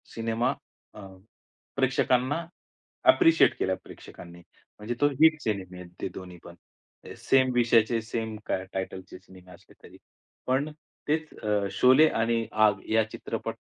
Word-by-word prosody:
Cinema 115 +3 -1 0.4
अ, 105 -2 -11 0.7
प्रेक्षकांना 130 +6 +1 0.6
appreciate 165 - +5
केला 95 - 0
प्रेक्षकांनी. 85 0 -13 0.4
म्हणजे 105 +3 -4
तो 145 - +5
हिट 160 -1 +5
सिनेमे 95 -4 -4
आहेत 90 -1 -11
ते - - -2
दोन्ही 90 -1 -9
पण. 85 - -12 0.6
सेम 130 -1 +2
विषयाचे 115 -1 +3
सेम 110 -1 -5
टायटलचे 95 -1 -5
सिनेमे 90 0 -17
असले - - -17
तरी. - - -15 0.5
पण 135 +4 0 0.4
तेच 160 +1 -1
अ, 105 -2 0
शोले 130 +5 +5
आणि 115 0 0
आग 105 -2 +2
या 110 0 +3
चित्रपट - - -5
115 Hz, 125 wpm, -27 LUFS, 95-130 Hz, 0.7 s, appreciate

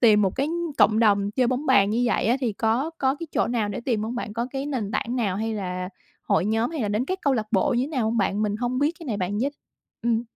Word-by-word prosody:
tìm 210 -3 +6
một 190 +3 0
cái 275 +3 0 0.3
cộng 215 0 +5
đồng 205 -2 +3
chơi 250 +2 +1
bóng 255 +4 -1
bàn 200 -6 +5
như 230 +3 +1
vậy - - +1
á, 240 +4 +3
thì 240 -5 0
có 230 +8 0
có 265 0 +2
cái 335 +3 -7
chỗ - - +2
nào 230 -3 0
để 205 - -4
tìm 235 -4 -1
hông 225 +3 -3
bạn? 240 -3 -4
Có 235 +2 -2
cái 270 +1 -3
nền 245 -8 -2
tảng 240 +3 -2
nào 200 -6 0
hay 220 +1 -2
là 180 -2 -3 0.3
hội - - +1
nhóm 225 +5 +1
hay 315 -5 -4
là 210 - 0
đến 210 +5 0
các 375 +5 -3
câu 280 - +3
lạc 215 -2 -1
bộ 220 +7 +2
như 245 +2 +1
thế - - -5
nào 260 -7 -1
hông 225 +2 0
bạn? 200 0 +1
Mình 210 0 0
hông 245 +2 -1
biết 295 +5 +1
cái 330 - -10
này, 220 -5 -1
bạn 195 +2 -2
giới 275 +4 +1 0.5
Ừm. 235 -1 +1
230 Hz, 290 wpm, -25 LUFS, 210-260 Hz, 0.5 s, tìm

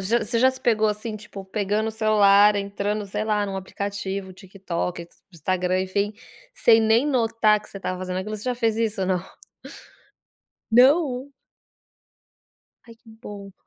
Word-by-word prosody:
você 230 +3 0
já 260 +2 +5
se 260 - -10
pegou, 220 -2 +2
assim, 215 +1 -4
tipo, 205 -2 -10
pegando 210 +2 -1
o - - -2
celular 210 -2 +4
entrando 200 +1 -2
sei 205 +2 -3
lá, 210 -1 0
num 195 -1 -4
aplicativo, 195 0 -5
TikTok, 180 -2 -5 0.3
Instagram, 180 +3 -1
enfim, 200 +3 -2 0.4
sem 225 - +5
nem 225 +5 +3
notar 225 -5 +2
que - - -16
você - - -10
estava 185 -1 -4
fazendo 185 0 -4
aquilo, 210 +3 -4
você 210 - -10
já 250 -1 -1
fez 230 -2 0
isso 225 -3 -1
ou - - -1
não? 180 -2 0 1.5
Não. 265 +1 +4 1.5
Ai 230 - -14
que 230 0 -23
bom. 205 -3 -10
210 Hz, 155 wpm, -23 LUFS, 195-225 Hz, 1.5 s, já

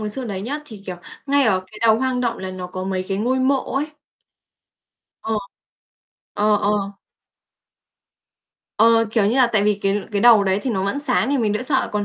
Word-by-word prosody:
Người 215 -1 -3
Xưa 260 +4 -5
đấy 200 -4 -5
nhá, 285 +7 -4
thì, 215 -7 -12
kiểu, 180 -2 -5 0.3
ngay 280 0 +3
ở 195 -6 +2
cái 210 +2 -13
đầu 225 -1 +4
hoang 260 -1 -1
động 235 -1 -1
là 190 0 -5
nó 185 -1 -6
có 185 +1 -6
mấy 185 -1 -2
cái 195 -1 -1
ngôi 250 +5 0
mộ 270 +1 +3 0.2
ấy. 300 +2 -2 1.3
Ờ, 225 - -2 1.0
ờ, 210 0 +2
ờ. 205 +1 +1 2.1
Ờ, 230 +1 +5
kiểu 215 -3 +2
như 230 - +1
là, 255 -2 +5
tại 215 -4 +1
vì 210 0 +3
cái 195 +1 +1
cái 200 - 0
đầu 230 -4 +7
đấy 190 0 +1
thì 260 - -2
nó 190 -3 -1
vẫn 200 +8 -1
sáng 265 -2 0
thì 285 - +1
mình 215 -4 +1
đã 215 +4 -2
sợ, 265 0 0
còn 205 -1 -1
220 Hz, 210 wpm, -21 LUFS, 200-255 Hz, 2.1 s, đầu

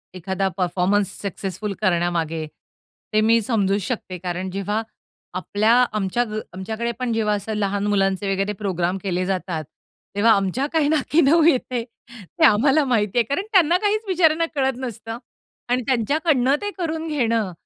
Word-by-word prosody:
एखादा 190 +2 -2
performance 185 +2 +1
successful 200 +1 -4
करण्यामागे 170 -4 0 0.7
ते 215 - +4
मी 230 +1 +4
समजू 200 -3 +1
शकते. 190 -3 -4
कारण 180 +1 -4
जेव्हा 200 +3 -2 0.5
आपल्या 205 +5 +1 0.2
आमच्या 215 +3 0
ग 215 0 -3
आमच्याकडे 220 +6 -3
पण 250 -2 -1
जेव्हा 215 -2 +1
असं 205 +2 -4
लहान 205 0 -1
मुलांचे 195 -1 +1
वगैरे 195 +2 -1
प्रोग्राम 180 -1 -1
केले 185 -2 -1
जातात 180 -4 -2 0.5
तेव्हा 220 +3 +4
आमच्या 195 +7 0
काय 310 -3 +3
नाकी 310 +2 +2
नऊ 315 +4 +5
येते 255 -6 +2
ते 235 - -3
आम्हाला 275 +7 +4
माहिती 215 -4 0
आहे. 240 - +5
कारण 280 - -2
त्यांना 350 -4 +5
काहीच 420 +2 0
बिचाऱ्यांना 330 -3 +3
कळत 265 -2 0
नसतं. 230 -3 -6 0.5
आणि 250 +1 +2
त्यांच्याकडनं 270 +2 +2
ते 410 0 -3
करून 325 -2 -3
घेणं 230 -9 0
215 Hz, 150 wpm, -22 LUFS, 195-265 Hz, 0.7 s, नऊ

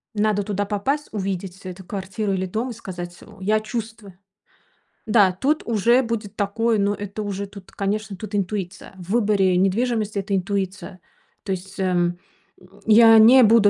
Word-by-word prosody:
Надо 210 -1 +1
туда 205 0 -2
попасть, 245 +9 -1
увидеть 190 -2 -4
эту 185 0 -9
квартиру 195 +2 -3
или 190 0 -1
дом 225 +7 -3
и - - -5
сказать: 175 -5 -7
"В 205 -2 -15
я 215 +3 +2
чувствую". 215 -3 -7 0.9
Да, 210 -4 +4
тут 275 +12 0
уже 235 +3 +3
будет 220 -3 -4
такое, 220 +3 0
но 200 +1 +2
это 205 +1 -5
уже 200 0 -4
тут, 200 -2 -13
конечно, 205 0 -3
тут 210 +1 -6
интуиция. 190 -1 -3
В 180 -1 -11
выборе 205 -5 +3
недвижимости 210 +2 0
это 195 0 -1
интуиция. 190 0 -3 0.4
То 195 - -2
есть, 190 +1 -8
эм, 175 -2 +1 0.4
м, 180 - -18 0.2
я 225 +1 +8
не 245 +4 +8
буду, 220 -2 +6
205 Hz, 160 wpm, -22 LUFS, 190-220 Hz, 0.9 s, я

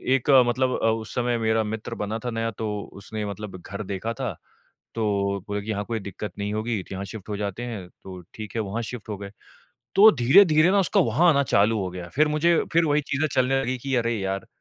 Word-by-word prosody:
एक 135 +1 -2 0.2
मतलब 130 +2 +1
अ, - - +2
उस 110 -1 -1
समय 120 -1 +1
मेरा 110 0 +1
मित्र 110 +1 -5
बना 105 +2 -3
था - - 0
नया 115 0 -2
तो 110 0 -4 0.2
उसने 105 +2 -6
मतलब 100 -1 -6
घर 100 +4 -6
देखा 100 +4 -4
था 120 -8 -4 0.6
तो 100 -3 0
बोले 105 0 -2
कि 105 - -9
यहाँ 100 -1 -1
कोई 115 -1 -3
दिक़्क़त 100 +1 -6
नहीं 105 +1 -3
होगी 110 -1 -1
तो - - -10
यहाँ 95 +1 -4
शिफ़्ट 105 +1 -9
हो 105 - -2
जाते 100 +3 -4
हैं 110 -7 -6 0.2
तो 95 -1 -9
ठीक 110 0 -8
है 115 - +1
वहाँ 110 +3 -3
शिफ़्ट 115 -1 -7
हो 105 - -3
गए। 100 0 -8 0.6
तो 215 +2 +9
धीरे-धीरे 155 +6 +6
ना 200 - +3
उसका 180 - +2
वहाँ 145 +10 +3
आना 140 -3 +4
चालू 110 -2 +2
हो 95 -2 -2
गया 90 -1 -7
फ़िर 150 +2 +4
मुझे 160 +3 +3 0.2
फ़िर 170 +1 +4
वही 150 -1 +2
चीज़ें 145 +1 -1
चलने 130 +1 +2
लगी 130 0 -1
कि 135 +2 -3
अरे 120 -1 +1
यार! 95 0 -3
110 Hz, 230 wpm, -25 LUFS, 100-130 Hz, 0.6 s, तो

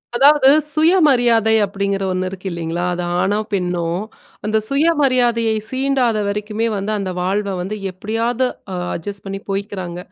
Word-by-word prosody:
அதாவது 275 +1 +6 0.2
சுயமரியாதை 260 - +4
அப்டிங்கிற 200 0 -2
ஒன்னு 185 0 -1
இருக்கு 190 0 -8
இல்லைங்களா. 170 +1 -3
அது 175 0 -3 0.2
ஆணோ, 205 +3 +1
பெண்ணோ 180 -3 -1 0.6
அந்த 215 +1 +1
சுயமரியாதையை 255 -7 +2
சீண்டாத 260 -3 +1
வரைக்குமே 210 +2 -2
வந்து 200 +2 -2
அந்த 190 -2 -3
வாழ்வ 195 +2 -1
வந்து 195 +4 -4 0.2
எப்டியாவது 225 +6 -1 0.5
அட்ஜஸ்ட் 200 +3 -6
பண்ணி 195 0 -5
போய்க்கிறாங்க. 195 -3 -4
210 Hz, 125 wpm, -19 LUFS, 190-245 Hz, 0.6 s, அதாவது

